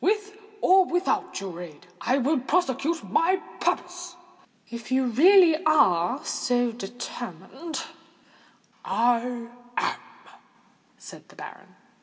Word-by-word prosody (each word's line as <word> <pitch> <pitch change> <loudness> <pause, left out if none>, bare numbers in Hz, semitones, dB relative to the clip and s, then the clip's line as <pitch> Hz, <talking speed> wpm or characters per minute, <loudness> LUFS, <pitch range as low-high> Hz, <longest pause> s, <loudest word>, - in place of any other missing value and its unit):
With 415 +2 0 0.3
or 375 0 +6
without 355 +1 -1
your 180 -3 -7
aid, 165 -1 -11 0.2
I 260 - +2 0.3
prosecute 325 -1 0
my 350 +3 +2 0.2
purpose." 355 0 -2 0.5
"If 235 +1 -9
you 260 +1 +3
are - - -1
really 310 - +4
so 245 -1 0
determined——" 240 - -7 1.0
"I 240 0 0 0.3
am," - - 0 1.0
said - - -13
the - - -17
baronet. - - -11
260 Hz, 100 wpm, -26 LUFS, 235-350 Hz, 1.0 s, or